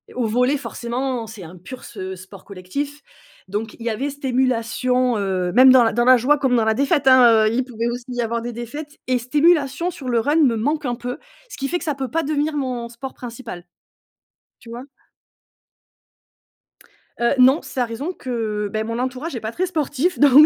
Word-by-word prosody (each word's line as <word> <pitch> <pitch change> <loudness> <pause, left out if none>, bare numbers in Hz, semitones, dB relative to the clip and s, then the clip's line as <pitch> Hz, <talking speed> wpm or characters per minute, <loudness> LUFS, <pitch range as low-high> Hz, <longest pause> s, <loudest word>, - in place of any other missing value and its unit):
au 250 - 0
volley 250 +6 +2
forcément 250 -2 -4
c'est 215 -4 -10
un 170 +3 -11
pur 250 +9 -10
se 190 -3 -7
sport 185 +1 -13
collectif. 280 +11 -5 0.5
Donc 210 +3 -4
il - - -8
y - - +1
avait 255 +6 -2
cette 285 0 -9
émulation, 250 -1 +1
heu, 190 -3 -1
même 255 +2 +8
dans 255 -2 +7
la 225 -1 +1
dans 240 +1 +2
la 255 0 +7
joie 280 +5 +3
comme 265 -3 +1
dans 225 -2 +2
la 220 - +3
défaite 280 +3 +1
hein, 240 -4 +7
heu, 215 - 0
il 255 - +1
pouvait 235 -2 -4
aussi 240 0 -5
y 245 -1 -2
avoir 235 0 -2
des 240 0 -5
défaites 290 +6 -7
et 255 -1 +2
cette 250 +5 -11
émulation 320 +1 +3
sur 265 -6 -7
le 235 - +2
run 290 +7 +1
me 270 -7 +4
manque 290 +7 -1
un 245 -1 -1
peu. 245 +1 -5 0.3
Ce - - -9
qui 275 - -2
fait 350 - -1
que - - -8
ça 300 -3 -1
peut 265 -2 -4
pas 330 +3 0
devenir 300 +1 -1
mon 250 -4 -3
sport 240 +3 -8
principal, 230 -7 -8 0.9
tu 230 - -14
vois? 240 +2 -7 2.4
Heu 235 0 +2
non 260 +4 +6
c'est 265 - -7
à - - +2
raison 265 +10 -5
que 220 - -3
beh 215 0 -1
mon 230 +1 -4
entourage 260 +4 -3
est - - -3
pas 220 - -4
très 365 +10 -1
sportif 320 0 -1
donc 290 +1 +8
250 Hz, 210 wpm, -21 LUFS, 230-275 Hz, 2.4 s, même